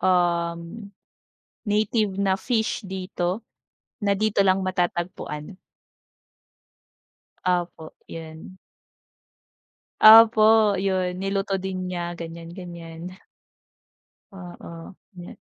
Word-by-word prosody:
um, 170 Hz, -2 st, +1 dB, 1.1 s
native 210 Hz, -1 st, 0 dB
na 190 Hz, -1 st, +2 dB
fish 220 Hz, 0 st, -1 dB
dito, 185 Hz, 0 st, -3 dB, 0.6 s
na 200 Hz, -, +3 dB
dito 215 Hz, -1 st, +1 dB
lang 190 Hz, 0 st, +3 dB
matatagpuan. 175 Hz, -2 st, -3 dB, 1.9 s
Opo, 175 Hz, -3 st, -2 dB, 0.2 s
'yun. 160 Hz, +3 st, -10 dB, 1.4 s
Opo, 220 Hz, -1 st, +8 dB
'yun 185 Hz, -2 st, -1 dB
niluto 195 Hz, 0 st, -1 dB
din 185 Hz, -1 st, -4 dB
niya, 175 Hz, -1 st, -4 dB
ganyan-ganyan. 170 Hz, 0 st, -8 dB, 1.2 s
Oo, 175 Hz, -2 st, -11 dB, 0.2 s
yun 180 Hz, -, -13 dB
nga. -, -, -10 dB
185 Hz, 80 wpm, -24 LUFS, 175-200 Hz, 1.9 s, Opo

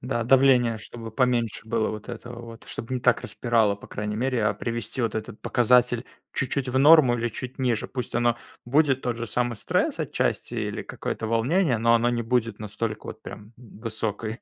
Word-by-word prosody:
Да, 120 Hz, -2 st, -2 dB
давление 125 Hz, -3 st, +4 dB
чтобы 115 Hz, +1 st, -9 dB
поменьше 120 Hz, -3 st, +1 dB
было 110 Hz, -1 st, +1 dB
вот 105 Hz, -1 st, -8 dB
этого 120 Hz, -1 st, -7 dB
вот, 115 Hz, 0 st, -11 dB
чтобы 120 Hz, +3 st, -5 dB
не 125 Hz, -, -2 dB
так 125 Hz, 0 st, +3 dB
распирало, 110 Hz, -4 st, +1 dB
по -, -, -13 dB
крайней 105 Hz, +1 st, -4 dB
мере. 125 Hz, -2 st, 0 dB
А 105 Hz, -1 st, +2 dB
привести 115 Hz, +2 st, -3 dB
вот 110 Hz, -2 st, -1 dB
этот 110 Hz, -1 st, -5 dB
показатель 125 Hz, 0 st, +3 dB, 0.3 s
чуть-чуть 130 Hz, 0 st, -1 dB
в 130 Hz, +1 st, +1 dB
норму 145 Hz, -4 st, +7 dB
или 120 Hz, 0 st, -1 dB
чуть 125 Hz, +4 st, -7 dB
ниже. 120 Hz, -4 st, 0 dB
Пусть 125 Hz, -4 st, -5 dB
оно 120 Hz, -1 st, +2 dB, 0.3 s
будет 135 Hz, +1 st, +2 dB
тот 120 Hz, -2 st, -1 dB
же 120 Hz, 0 st, -4 dB
самый 120 Hz, +2 st, 0 dB
стресс -, -, 0 dB
отчасти -, -, -1 dB
или -, -, -3 dB
какое-то 110 Hz, -, -4 dB
волнение, 125 Hz, -, +2 dB
но 115 Hz, +1 st, +4 dB
оно 115 Hz, +1 st, +3 dB
не 120 Hz, -1 st, -1 dB
будет 115 Hz, -2 st, 0 dB
настолько 110 Hz, +1 st, -4 dB
вот -, -, -8 dB
прям 105 Hz, +2 st, -10 dB
в 115 Hz, -3 st, -15 dB
высокой 110 Hz, 0 st, -3 dB
120 Hz, 190 wpm, -25 LUFS, 110-125 Hz, 0.3 s, норму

